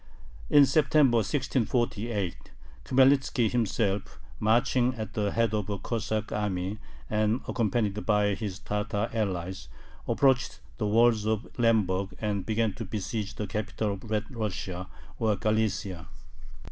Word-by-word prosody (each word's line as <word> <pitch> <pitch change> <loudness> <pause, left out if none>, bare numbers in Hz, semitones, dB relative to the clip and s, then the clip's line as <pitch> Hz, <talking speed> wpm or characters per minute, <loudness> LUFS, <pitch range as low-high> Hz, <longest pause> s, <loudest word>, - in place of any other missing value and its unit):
In 145 -1 +7
September, 135 -2 +4
1648, 115 - -1 0.4
Khmelnitzki 135 -3 +3
himself, 105 -4 -1 0.2
marching 120 +3 +2
at 110 -2 -6
the 105 -1 0
head 115 -1 +1
of 105 -2 -1
a 100 - -1
Cossack 110 0 -3
army, 100 -1 -2 0.3
and 110 +3 +1
accompanied 105 -2 0
by 105 -1 +2
his 100 -2 -4
Tatar 105 +2 -2
allies, 95 -5 -2 0.4
approached 130 -7 +2 0.2
the 105 - 0
walls 110 0 +3
of 110 0 0
Lemberg, 100 -5 +2
and 105 -3 -2
began 110 -1 +1
to 115 - -6
besiege 105 0 -4
the 105 - -3
capital 105 0 -2
of 100 +3 -9
Red 110 +3 -2
Russia, 95 -4 -4 0.3
or 110 -3 +2
Galicia. 105 -6 -1
110 Hz, 125 wpm, -28 LUFS, 100-115 Hz, 0.4 s, In